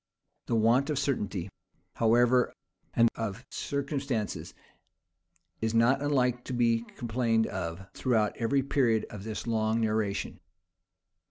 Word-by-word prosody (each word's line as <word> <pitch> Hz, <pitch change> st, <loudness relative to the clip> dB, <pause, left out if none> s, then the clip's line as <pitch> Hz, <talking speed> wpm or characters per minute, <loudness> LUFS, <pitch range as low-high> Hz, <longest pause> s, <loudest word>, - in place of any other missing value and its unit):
The 115 Hz, -, +1 dB
want 115 Hz, +6 st, +3 dB
of 150 Hz, -, 0 dB
certainty, 105 Hz, -10 st, -1 dB, 0.5 s
however, 120 Hz, +2 st, +3 dB, 0.4 s
and 115 Hz, -, +6 dB
of 115 Hz, +1 st, -5 dB
circumstances, 135 Hz, -, -3 dB, 1.1 s
is 110 Hz, 0 st, 0 dB
not 125 Hz, +4 st, +4 dB
unlike 125 Hz, -4 st, +1 dB
to -, -, -4 dB
be 115 Hz, -2 st, +2 dB, 0.2 s
complained 115 Hz, -1 st, +1 dB
of 90 Hz, 0 st, -4 dB
throughout 110 Hz, -5 st, +1 dB
every 135 Hz, +4 st, +1 dB
period 120 Hz, -5 st, +2 dB
of 105 Hz, -1 st, -8 dB
this 110 Hz, -2 st, -4 dB
long 110 Hz, -1 st, +1 dB
narration. 110 Hz, -2 st, -1 dB
115 Hz, 115 wpm, -29 LUFS, 110-125 Hz, 1.1 s, and